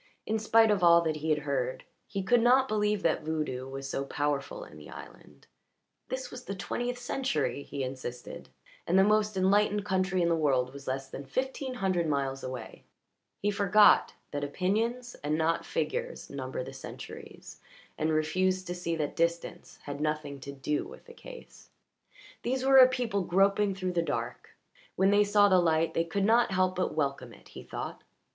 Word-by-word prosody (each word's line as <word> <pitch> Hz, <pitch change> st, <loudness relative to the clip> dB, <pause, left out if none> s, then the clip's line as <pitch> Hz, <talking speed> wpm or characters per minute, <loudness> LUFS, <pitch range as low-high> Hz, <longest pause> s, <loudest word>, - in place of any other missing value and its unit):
In 220 Hz, +1 st, -1 dB
spite 220 Hz, 0 st, +4 dB
of 200 Hz, -2 st, +1 dB
all 170 Hz, -1 st, +6 dB
that 155 Hz, -2 st, -1 dB
he 155 Hz, +1 st, -4 dB
had 150 Hz, -2 st, +1 dB
heard 130 Hz, -3 st, -2 dB, 0.2 s
he 195 Hz, -2 st, -3 dB
could 240 Hz, +4 st, +3 dB
not 255 Hz, +3 st, +5 dB
believe 210 Hz, -2 st, 0 dB
that 165 Hz, -, +2 dB
voodoo 150 Hz, -5 st, -3 dB
was 135 Hz, 0 st, -6 dB
so 135 Hz, -, -2 dB
powerful 145 Hz, 0 st, -2 dB
in -, -, -13 dB
the 75 Hz, -1 st, -12 dB
island; -, -, -13 dB, 0.6 s
this 260 Hz, 0 st, -4 dB
was 250 Hz, 0 st, -9 dB
the 195 Hz, -, -4 dB
twentieth 245 Hz, +5 st, -3 dB
century, 260 Hz, -, -2 dB
he 140 Hz, -1 st, -5 dB
insisted, 130 Hz, -1 st, -7 dB, 0.4 s
and 180 Hz, -, +3 dB
the 190 Hz, -, +7 dB
most 210 Hz, 0 st, +2 dB
enlightened 205 Hz, +2 st, +2 dB
country 185 Hz, -2 st, +1 dB
in -, -, +2 dB
the 170 Hz, -, +3 dB
world 135 Hz, -5 st, +1 dB
was 140 Hz, 0 st, -11 dB
less 135 Hz, +1 st, -3 dB
than 135 Hz, -, -8 dB
fifteen 260 Hz, -, -3 dB
hundred 185 Hz, -7 st, 0 dB
miles 135 Hz, -2 st, -1 dB
away; 130 Hz, -3 st, -7 dB, 0.6 s
he 205 Hz, -, +2 dB
forgot 205 Hz, +1 st, +5 dB, 0.2 s
that 145 Hz, 0 st, -3 dB
opinions 225 Hz, -, -1 dB
and 150 Hz, +1 st, 0 dB
not 165 Hz, +1 st, 0 dB
figures -, -, -3 dB
number -, -, -4 dB
the -, -, -9 dB
centuries, -, -, -10 dB, 0.4 s
and 155 Hz, 0 st, 0 dB
refused 185 Hz, +4 st, +1 dB
to 175 Hz, -, -4 dB
see 175 Hz, -2 st, -3 dB
that 150 Hz, -2 st, -3 dB
distance 170 Hz, 0 st, -2 dB
had 145 Hz, 0 st, -6 dB
nothing 150 Hz, -2 st, -2 dB
to 140 Hz, +1 st, -7 dB
do 140 Hz, +2 st, -2 dB
with -, -, -12 dB
the 470 Hz, -, -13 dB
case. -, -, -13 dB, 0.7 s
These 260 Hz, +1 st, -1 dB
were 270 Hz, 0 st, +6 dB
a 255 Hz, 0 st, +9 dB
people 240 Hz, -6 st, -1 dB
groping 195 Hz, +2 st, +2 dB
through 185 Hz, -1 st, -3 dB
the 170 Hz, -, +2 dB
dark; 165 Hz, -, -4 dB, 0.4 s
when 195 Hz, +1 st, +3 dB
they 205 Hz, +1 st, +5 dB
saw 205 Hz, 0 st, +4 dB
the 185 Hz, -2 st, +5 dB
light 165 Hz, -1 st, +2 dB
they 165 Hz, -, +1 dB
could 195 Hz, +4 st, -1 dB
not 235 Hz, +3 st, +4 dB
help 185 Hz, -1 st, +1 dB
but 185 Hz, -3 st, -1 dB
welcome 140 Hz, -5 st, -2 dB
it, -, -, -17 dB
he -, -, -10 dB
thought. -, -, -6 dB
185 Hz, 185 wpm, -29 LUFS, 145-210 Hz, 0.7 s, a